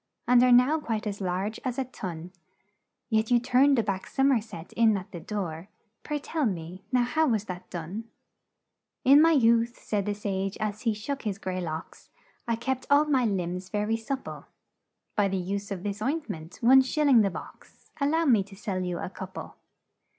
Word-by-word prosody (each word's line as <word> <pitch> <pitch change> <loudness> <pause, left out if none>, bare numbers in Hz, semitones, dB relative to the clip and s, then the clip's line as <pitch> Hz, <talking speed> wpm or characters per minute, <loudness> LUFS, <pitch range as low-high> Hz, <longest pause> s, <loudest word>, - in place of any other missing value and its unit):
And 245 0 +6
are 250 0 +5
now 250 +6 +5
quite 225 -7 -3
as 205 -1 -4
large 190 +4 -2
as 250 -2 -3
a 265 - +1
tun; 180 -8 -7 0.8
Yet 220 0 +2
you 245 - +5
turned 255 +3 +4
a 230 - +3
back 195 -2 -3
som 270 +1 +2
er 240 -5 +3
set 180 -6 -10
in 225 -3 +4
at 185 - -8
the 175 - -7
door 175 -3 -5 0.3
Pray, 300 - -3
tell 295 -1 -1
me 180 -1 -5
now, 250 -1 +3
how 310 +6 +1
was 220 -6 +1
that 180 -3 -8
done?' 180 +6 -6 1.0
"'In 280 +3 +8
my 330 +1 +6
youth,' 235 -3 +3
said 205 -2 -2
the 205 - -1
sage, 195 -1 -3
as 215 0 -3
he 215 - 0
shook 275 +7 -4
his 205 -4 -3
gray 185 -1 -4
locks. 160 -2 -7 0.4
I 230 - +1
kept 260 +2 -3
all 285 +1 +5
my 265 -5 +2
limbs 185 -2 -2
ver 210 +1 -1
y 225 +1 +1
sup 260 +4 -4
ple - - -8 0.7
By 205 -1 +3
the 195 0 -1
use 200 +2 -3
of 190 -3 -5
this 205 0 -3
oint 295 +7 -1
ment 165 -5 -7
one 260 +3 +7
shil 300 +3 0
ling 260 -5 +6
the 200 - +2
box - - -12
Al 280 0 +2
low 325 +2 +2
me 235 -8 +5
to 195 -1 -14
sell 190 -2 -3
you 180 -1 -2
a - - -4
coup 190 +1 -7
le.' - - -7
215 Hz, 210 wpm, -27 LUFS, 190-255 Hz, 1.0 s, In